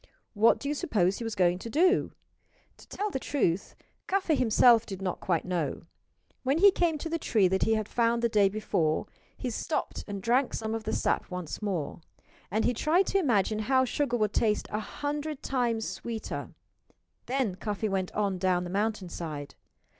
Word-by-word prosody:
What 225 +2 +5
do 280 - -6
you 290 - 0
suppose 200 - +1
he - - -4
was 225 -1 -3
going 180 -2 +2
to 230 - -7
do? 360 - +3 0.7
To - - -16
tell 415 0 -3
the 265 - -2
truth, 200 - -1 0.3
Cuffy 380 -4 +1
himself 235 -3 +5
did 195 -4 -7
not 190 -2 -3
quite 170 -4 0
know. 175 -6 -2 0.6
When 270 +3 +1
he 400 +3 +7
came 340 -4 +1
to 300 - -5
the 330 +1 -2
tree 210 -9 +3
that 190 +1 0
he 225 - +3
had 215 -1 -2
found 235 0 +1
the - - +5
day 205 -3 +3
before 175 -7 0 0.3
he 250 - -3
stopped 305 +7 -3
and 200 -1 -4
drank 245 +6 +1
some 220 0 -3
of 225 -1 -4
the 220 - -1
sap - - 0
once 180 -1 -5
more; 175 -7 -3 0.5
and 215 +4 0
he 245 - +2
tried 320 - +2
to 395 - +4
imagine 215 - +1
how 260 +4 +3
sugar 255 -1 0
would 215 -2 0
taste 210 -2 +1
a 210 - -1
hundred 290 +5 -4
times 235 -4 0
sweeter. 225 -2 -5 0.8
Then 255 -5 0
Cuffy 210 +3 -3
went 190 -2 -1
on 200 -3 0
down 180 -1 +1
the 175 - -6
mountainside. 180 -8 -3
220 Hz, 185 wpm, -29 LUFS, 190-265 Hz, 0.8 s, he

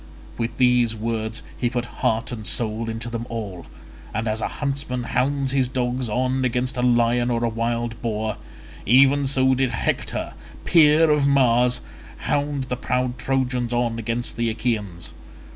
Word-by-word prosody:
With 115 0 -3
these 125 -3 +3
words 110 0 -3
he 120 - 0
put 120 0 -2 0.2
heart 115 +3 +1
and 110 -4 -5
soul 115 0 -2
into 115 +1 -5
them 115 0 -4
all, 100 -7 -6 0.5
and 110 +2 -1
as 110 +1 -1
a - - 0
huntsman 140 -3 -3
hounds 135 +2 0
his 135 -2 +2
dogs 125 -1 -2
on 130 +3 0
against 125 +1 0
a 125 - -1
lion 120 0 +3
or 120 -1 0
wild 115 0 -2
boar, 110 -2 -2 0.5
even 135 +4 +5
so 130 -1 +3
did 130 0 +1
Hector, 115 - -2 0.3
peer 155 -1 +5
of 145 -2 +3
Mars, 125 -3 +3 0.4
hound 145 -1 -1
the 125 -1 -3
proud 125 0 -1
Trojans 125 -2 0
on 120 -1 0
against 115 +2 -2
the 115 -1 +1
Achaeans. 110 -6 -3
120 Hz, 155 wpm, -23 LUFS, 115-130 Hz, 0.5 s, even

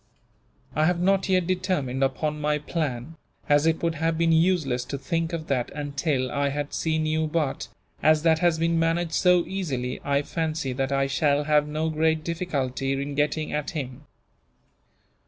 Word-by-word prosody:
I 155 +1 +3
have 175 -1 +1
not 195 +2 +2
yet 185 -2 +3
determined 180 -8 -1
upon 150 +3 -1
my 150 0 +1
plan, 150 -1 -4 0.3
as 145 +2 +4
it 165 +1 +1
would 165 -1 +1
have 165 +1 -1
been 165 0 +2
useless 160 -7 +2
to 140 - -4
think 165 +4 -2
of 165 -2 -4
that, 130 -5 -1
until 140 -3 -1
I 140 0 0
had 145 +1 -4
seen 160 -1 0
you 155 0 0
but, 150 -3 -1 0.3
as 155 0 +4
that 160 -1 +4
has 175 -2 +3
been 165 0 +1
managed 165 0 0
so 180 -1 +4
easily, 140 -10 -3
I 140 0 +1
fancy 155 -4 -2
that 135 +1 -2
I 135 0 +2
shall 140 +1 +1
have 150 0 +3
no 155 +2 -1
great 160 0 +1
difficulty 140 -6 -2
in 140 +1 -3
getting 150 +2 -1
at 150 -1 -2
him. 140 -2 -6
155 Hz, 175 wpm, -25 LUFS, 140-165 Hz, 0.3 s, as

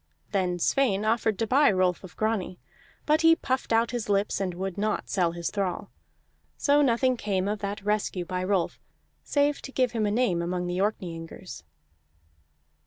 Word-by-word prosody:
Then 180 -2 0
Sweyn 210 +1 +1
offered 220 -2 +1
to 225 - 0
buy 280 +6 +4
Rolf 185 -2 +1
of 185 - -12
Grani, 215 -5 -1 0.5
but 305 +1 +3
he 330 0 +6
puffed 260 -6 -2
out 230 0 +3
his 240 -4 -4
lips 200 0 +1
and 185 -2 -2
would 190 0 -4
not 210 +1 -1
sell 175 -4 +1
his 170 0 -3
thrall. 195 -4 -3 0.7
So 290 0 +3
nothing 255 -1 +2
came 195 -3 -1
of 210 +1 -2
that 200 0 -5
rescue 205 -4 -1
by 180 +1 -3
Rolf, 185 -2 0 0.4
save 290 0 +1
to 270 - -8
give 255 -3 +1
him 220 -3 0
a - - +1
name 205 -7 +1
among 180 +1 -2
the 175 +1 -2
Orkneyingers. 175 - -4
205 Hz, 175 wpm, -27 LUFS, 185-235 Hz, 0.7 s, he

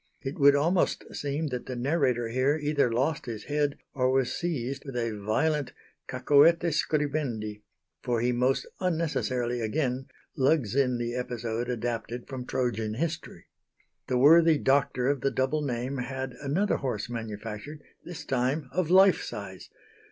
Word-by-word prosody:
It 135 +2 -5
would 140 0 +7
almost 170 +5 +1
seem 145 +2 -2
that 125 -2 -5
the 130 - -4
narrator 125 -3 +1
here 130 +5 +2
either 145 -4 +1
lost 135 +5 0
his 110 -3 -5
head 145 -1 -1 0.2
or 130 -2 +1
was 130 -1 +1
seized 140 -6 -3
with 135 -3 -8
a 115 -2 -1
violent 135 +8 0 0.3
cacoethes 150 +5 +4
scribendi, 135 -9 -2 0.4
for 120 -2 0
he 120 +2 +1
most 125 +2 +1
unnecessarily 135 -9 -1
again 130 +3 -1 0.3
lugs 135 -5 +2
in 130 -3 +2
the 120 0 -3
episode 120 -1 -3
adapted 120 0 -3
from 130 -2 -6
Trojan 115 -4 -1
history. 160 +4 -4 0.6
The 125 - +1
worthy 160 +4 +6
doctor 135 -2 +2
of 140 -2 +1
the 135 - +2
double 130 +4 0
name 130 0 -2
had 130 +1 -4
another 160 +9 +1
horse 120 -6 -3
manufactured, 115 +5 -6 0.2
this 175 -2 -8
time 130 +2 -1
of 180 -3 -1
life 190 +1 +6
size. - - -7
130 Hz, 145 wpm, -28 LUFS, 120-150 Hz, 0.6 s, would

